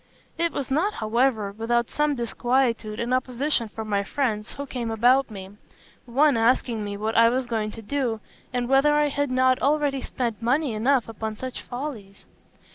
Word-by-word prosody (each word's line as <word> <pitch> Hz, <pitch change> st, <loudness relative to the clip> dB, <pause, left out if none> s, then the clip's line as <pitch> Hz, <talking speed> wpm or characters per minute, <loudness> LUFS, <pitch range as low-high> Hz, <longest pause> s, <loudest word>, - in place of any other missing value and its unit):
It 335 Hz, 0 st, 0 dB
was 270 Hz, -1 st, -4 dB
not, 355 Hz, +10 st, +1 dB
however, 220 Hz, -1 st, +1 dB
without 235 Hz, +2 st, 0 dB
some 295 Hz, -1 st, +1 dB
disquietude 240 Hz, -2 st, 0 dB
and 240 Hz, +2 st, -1 dB
opposition 255 Hz, 0 st, 0 dB
from 220 Hz, +1 st, -7 dB
my 200 Hz, -1 st, +1 dB
friends 215 Hz, -2 st, -2 dB
who 280 Hz, -, -5 dB
came 245 Hz, -4 st, -4 dB
about 245 Hz, +4 st, +3 dB
me; 195 Hz, -3 st, -9 dB, 0.6 s
one 280 Hz, +4 st, +3 dB
asking 230 Hz, -1 st, +2 dB
me 205 Hz, 0 st, -4 dB
what 220 Hz, +2 st, -2 dB
I 230 Hz, 0 st, +6 dB
was 255 Hz, +2 st, 0 dB
going 220 Hz, -3 st, -2 dB
to 225 Hz, +1 st, -9 dB
do, 240 Hz, -1 st, -1 dB, 0.3 s
and 245 Hz, -1 st, -1 dB
whether 275 Hz, +3 st, +4 dB
I 295 Hz, 0 st, +3 dB
had 285 Hz, 0 st, -1 dB
not 255 Hz, 0 st, +3 dB
already 285 Hz, -1 st, +1 dB
spent 240 Hz, -4 st, -3 dB
money 260 Hz, +3 st, +1 dB
enough 240 Hz, +3 st, +2 dB
upon 220 Hz, -1 st, -5 dB
such 255 Hz, +3 st, -6 dB
follies? 245 Hz, -7 st, -7 dB
245 Hz, 175 wpm, -25 LUFS, 220-270 Hz, 0.6 s, I